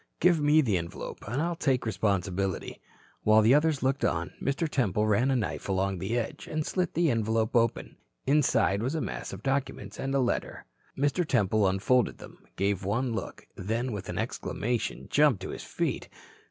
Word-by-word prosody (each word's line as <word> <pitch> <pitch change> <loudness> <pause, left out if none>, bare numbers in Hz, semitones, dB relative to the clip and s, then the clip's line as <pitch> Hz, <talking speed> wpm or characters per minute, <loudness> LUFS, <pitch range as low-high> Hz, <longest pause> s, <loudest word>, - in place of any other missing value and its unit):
Give 175 -2 +4
me 150 +2 +5
the 105 -10 +1
envelope. 85 0 -7
I'll 160 +9 -1
take 135 -6 +1
the - - -9
responsibility." 95 -3 -1 0.4
While 110 0 +5
the 115 +4 +6
others 150 -1 +2
looked 135 +2 +1
on, 80 0 0
Mr. 140 +4 0
Temple 105 - +1
ran 110 +5 +2
a 135 - +2
knife 110 -4 -2
along 95 -1 0
the 115 +7 -1
edge 115 - -4
and 155 -1 -2
slit 180 -2 -1
the 165 -2 +3
envelope 110 0 0
open. 115 -1 +1 0.3
Inside 130 -8 +3
was 130 +7 -1
a - - 0
mass - - -4
of - - -8
documents 135 -6 -2
and 135 +1 -2
a - - +3
letter. 125 -2 -1 0.3
Mr. 145 +6 +1
Temple 110 - +2
unfolded 105 +6 +2
them, - - -13 0.2
gave 100 0 0
one 115 +6 0
look, 110 - -5
then 115 +6 -2
with 105 -4 -5
an - - -4
exclamation 120 +1 -2
jumped 145 -8 +4
to - - -5
his - - -6
feet. - - -3
120 Hz, 180 wpm, -28 LUFS, 100-140 Hz, 0.4 s, the